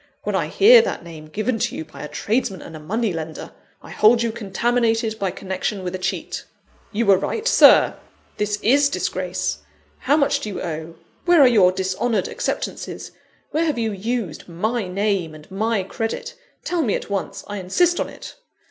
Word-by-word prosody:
When - - -2
I - - 0
hear 465 +4 +7
that 460 - -3
name 160 -2 -10
given 215 +8 -2
to - - -1
you 160 - -5
by 155 - -12
a 150 - -5
tradesman 195 - -2
and 155 -1 -10
money 220 -1 0
lender, 160 -1 -6 0.3
I - - -11
hold 230 +2 +4
you 230 - 0
contaminated 225 +1 0
by 195 - 0
connection 190 +2 -4
with 180 0 -4
a 185 - -4
cheat. - - -3 0.5
You 230 +2 0
were 195 -2 +5
right, 445 - -2
Sir! - - +6 0.4
this 210 0 0
is 280 +5 +4
disgrace; 185 -1 -2 0.4
how 290 - +2
much 280 -3 +2
do 215 - -5
you 200 - -5
owe? 160 -1 -5 0.3
Where 350 -2 +5
are 270 - +8
your 205 -7 +5
dishonoured 190 +3 -1
acceptances? - - -4 0.4
Where 320 +2 +1
have 305 -6 0
you 225 -2 0
used 205 -4 -4
my 215 +5 -2
name 190 -4 -1
and 155 +4 -15
my 215 +1 0
credit? 225 +4 -4 0.3
Tell 350 -2 0
me 225 -9 +1
at - - -6
once 195 -1 -3
I 205 - -6
insist 345 - +2
on - - -1
it!" - - -11
205 Hz, 185 wpm, -22 LUFS, 185-235 Hz, 0.5 s, are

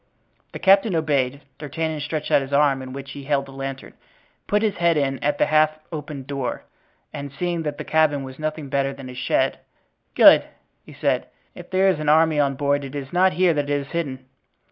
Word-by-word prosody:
The - - -5
captain 195 0 +4
obeyed. 140 -4 0 0.2
D'Artagnan 155 +1 -3
stretched 150 +1 -4
out - - +5
his 135 0 -7
arm 140 -2 +3
in 130 0 -8
which 140 +1 -8
he 140 -1 -9
held 140 -1 0
the 135 - -13
lantern, 135 0 -7 0.5
put 210 +1 +1
his 210 -4 0
head 170 -2 +2
in 135 -2 -1
at 145 0 +1
the - - +3
half 155 0 +3
opened 150 -3 -6
door, 135 -2 -4 0.5
and 140 -2 -6
seeing 175 +3 -2
that 150 -2 -4
the - - -5
cabin 155 -3 +2
was 130 +1 -10
nothing 155 -1 -4
better 135 0 -1
than 135 -2 -10
a - - -8
shed: 125 - 0 0.6
"Good," - - +8 0.4
he - - -14
said. - - -1 0.3
"If - - -12
there 190 +1 +2
is 185 -5 +2
an 155 -1 -1
army 160 0 +4
on 140 -1 +1
board 145 +1 0
it 135 +1 -8
is 140 0 -6
not 185 +1 +4
here 180 -1 +3
that 145 -1 -2
it 145 0 +1
is 140 - -11
hidden. 135 -6 -4
145 Hz, 210 wpm, -22 LUFS, 135-160 Hz, 0.6 s, Good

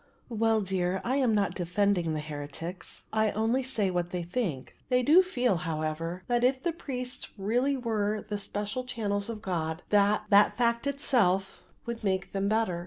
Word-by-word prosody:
"Well, 225 -1 +2
dear, 190 -1 0
I 255 +3 0
am 250 -6 +3
not 200 -1 +1
defending 180 -1 +1
the 155 - -2
heretics. 150 +4 -7
I 220 0 +3
only 225 +5 +1
say 220 -7 -1
what 175 -1 -1
they 180 -1 -3
think. 170 - -3
They 250 0 +3
do 315 +8 +7
feel, 250 - +1
however, 165 +1 -3
that 240 0 +1
if 260 +1 +2
the 345 - +1
priests 255 -6 -4
really 245 +8 +1
were 215 -3 -1
the 205 -1 -3
special 210 +5 -3
channels 205 -4 -2
of 220 -2 -6
God 160 -2 -2
that 205 0 +3
that 205 +1 +6
fact 235 +2 +1
itself 220 -9 +1 0.2
would 235 -1 -5
make 190 -1 -1
them 195 0 0
better. 215 -5 +1
205 Hz, 175 wpm, -29 LUFS, 180-245 Hz, 0.2 s, do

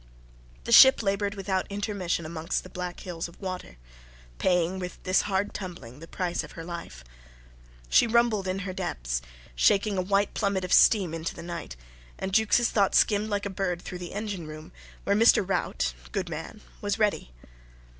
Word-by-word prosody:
The - - -5
ship 265 0 +9
laboured 200 0 0
without 190 -1 -2
intermission 200 -5 -2
amongst 165 +2 -3
the 185 - -12
black 180 -1 -5
hills 170 -2 -5
of 170 - -17
water, 185 - -6 0.6
paying 180 0 +1
with 180 -1 -6
this 185 0 +3
hard 195 +1 0
tumbling 145 - -8
the 165 - -11
price 175 0 -2
of - - -11
her 165 - -8
life. 170 - -8 0.8
She 150 - +5
rumbled 225 -4 +2
in 185 +1 -1
her 185 - -4
depths, - - -3 0.3
shaking 195 - +3
a - - +2
white 200 +2 +1
plummet 200 -2 0
of 180 - -1
steam 190 -7 +5
into 165 0 -4
the - - -8
night, 170 - -6 0.4
and 190 0 -4
Jukes' 220 +3 +4
thought 200 -3 +2
skimmed 210 0 +3
like 205 -1 -1
a 200 - -3
bird 180 -2 -2
through 180 - -7
the 175 -1 -7
engine 205 -6 -4
room, 155 +1 -10 0.3
where 200 - +1
Mr. 215 -3 +5
Rout 65 - -1 0.2
good - - -2
man - - -7 0.2
was - - -1
ready. - - 0
185 Hz, 175 wpm, -27 LUFS, 170-200 Hz, 0.8 s, ship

